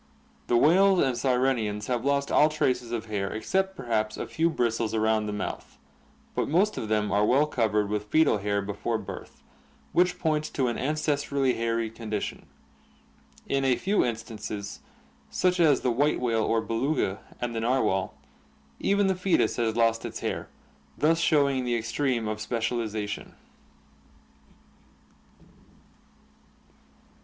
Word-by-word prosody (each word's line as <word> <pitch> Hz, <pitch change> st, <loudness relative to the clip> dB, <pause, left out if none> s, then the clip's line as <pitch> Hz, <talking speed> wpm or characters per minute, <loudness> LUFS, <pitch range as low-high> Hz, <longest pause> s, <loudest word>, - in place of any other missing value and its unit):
The 120 Hz, -, +3 dB
whales 190 Hz, +8 st, +5 dB
and 130 Hz, -5 st, +2 dB
sirenians 125 Hz, -5 st, 0 dB
have 120 Hz, 0 st, -1 dB
lost 140 Hz, 0 st, 0 dB
all 150 Hz, -, +5 dB
traces 125 Hz, -6 st, -1 dB
of 115 Hz, -2 st, -3 dB
hair 100 Hz, -3 st, -3 dB
except 190 Hz, +12 st, -1 dB
perhaps 110 Hz, -, -1 dB
a -, -, -3 dB
few 165 Hz, +1 st, +1 dB
bristles 115 Hz, -6 st, -1 dB
around 110 Hz, -1 st, +1 dB
the -, -, -2 dB
mouth, 105 Hz, -1 st, -5 dB, 0.6 s
but -, -, -1 dB
most 190 Hz, +7 st, +2 dB
of 110 Hz, -, -4 dB
them 105 Hz, -1 st, 0 dB
are 100 Hz, +1 st, +3 dB
well 135 Hz, +7 st, +4 dB
covered 110 Hz, -7 st, 0 dB
with 105 Hz, 0 st, -2 dB
foetal 155 Hz, -3 st, +3 dB
hair 100 Hz, 0 st, -1 dB
before 100 Hz, +3 st, -2 dB
birth, -, -, -9 dB, 0.5 s
which 180 Hz, 0 st, +3 dB
points 155 Hz, -1 st, 0 dB
to 130 Hz, -3 st, 0 dB
an 120 Hz, -, -3 dB
ancestrally 140 Hz, -2 st, 0 dB
hairy 115 Hz, -1 st, -1 dB
condition. 110 Hz, -2 st, -5 dB, 1.0 s
In 135 Hz, 0 st, 0 dB
a 130 Hz, -2 st, +3 dB
few 200 Hz, +8 st, +1 dB
instances, 110 Hz, -3 st, -5 dB, 0.5 s
such 180 Hz, 0 st, +1 dB
as 150 Hz, -5 st, +4 dB
the 125 Hz, -, +1 dB
white 145 Hz, +6 st, +1 dB
whale 115 Hz, -3 st, +1 dB
or 115 Hz, 0 st, +1 dB
Beluga 115 Hz, -2 st, -1 dB, 0.2 s
and 120 Hz, -1 st, -3 dB
the 115 Hz, -, -2 dB
narwhal, 115 Hz, -6 st, 0 dB, 0.6 s
even 200 Hz, 0 st, +2 dB
the 190 Hz, -, +3 dB
foetus 185 Hz, 0 st, +1 dB
has 115 Hz, -2 st, 0 dB
lost 115 Hz, -1 st, +2 dB
its -, -, -6 dB
hair, -, -, -3 dB, 0.5 s
thus 165 Hz, +2 st, +3 dB
showing 140 Hz, -6 st, +2 dB
the 120 Hz, -1 st, 0 dB
extreme 115 Hz, 0 st, -1 dB
of 110 Hz, 0 st, -3 dB
specializa 110 Hz, -1 st, -2 dB
tion. 105 Hz, -, -7 dB
120 Hz, 145 wpm, -27 LUFS, 110-145 Hz, 1.0 s, whales